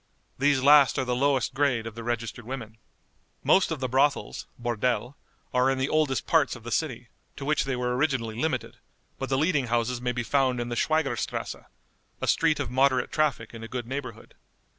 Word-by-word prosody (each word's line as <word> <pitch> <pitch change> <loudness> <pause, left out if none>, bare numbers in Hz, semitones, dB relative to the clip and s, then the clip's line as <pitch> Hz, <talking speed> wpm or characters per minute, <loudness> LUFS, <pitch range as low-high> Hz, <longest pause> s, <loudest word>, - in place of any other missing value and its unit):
These 140 -1 +3
last 145 -1 +6
are 130 - 0
the 125 0 0
lowest 135 -1 +1
grade 130 -4 +1
of 115 - -6
the 115 +1 -8
registered 120 0 -3
women. 115 -2 -7 0.6
Most 190 - +4
of 160 -3 -3
the 130 - -1
brothels 135 +3 0
(bordelle) 120 +1 -1 0.4
are 125 +1 +3
in 135 - +1
the 130 +1 0
oldest 150 -5 +1
parts - - +2
of - - -12
the - - -7
city, - - -2 0.3
to 135 - -7
which 150 0 +1
they 135 -1 -1
were 125 0 -1
originally 130 -6 0
limited, 155 +7 -2 0.4
but 135 - -3
the 135 - +1
leading 150 -3 +1
houses 120 +1 0
may 125 0 0
be 120 0 -3
found 130 -1 +1
in 120 0 -3
the 120 - -3
Schwieger 155 +3 +1
strasse, - - -3 0.6
a - - -2
street 155 -2 +3
of 130 -4 -3
moderate 130 -1 +2
traffic 145 -8 0
in 115 - -9
a 115 - -6
good 125 0 -4
neighborhood. 135 +2 -6
130 Hz, 200 wpm, -27 LUFS, 120-140 Hz, 0.6 s, last